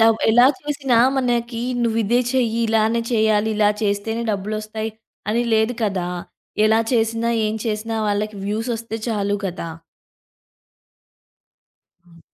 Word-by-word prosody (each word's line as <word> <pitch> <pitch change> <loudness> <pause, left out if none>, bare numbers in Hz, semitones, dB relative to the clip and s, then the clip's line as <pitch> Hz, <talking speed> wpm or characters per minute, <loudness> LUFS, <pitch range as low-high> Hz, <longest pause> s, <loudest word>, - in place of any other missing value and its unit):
Dub 225 0 +5
ఎలా 245 +3 +6
చూసినా 280 -5 0 0.2
మనకి 240 -2 0 0.2
నువ్విదే 230 +1 +2
చెయ్యి, 235 -3 +1
ఇలానే 225 +1 +2
చేయ్యాలి, 220 -1 +2
ఇలా 210 -1 +4
చేస్తేనే 210 +3 -1
డబ్బులొస్తాయి 215 +2 -3 0.4
అని 235 +2 +1
లేదు 220 +2 +2
కదా! 190 -4 -1 0.6
ఎలా 220 +1 +4
చేసినా, 230 0 +1 0.2
ఏం 215 - -1
చేసినా, 220 +1 -2
వాళ్ళకి 210 +1 -1
వ్యూస్ 220 +4 -2
ఒస్తే 225 0 -5
చాలు 205 -2 0
గదా! 175 -2 -5 2.3
హ్మ్. 170 -1 -20
220 Hz, 115 wpm, -21 LUFS, 210-230 Hz, 2.3 s, ఎలా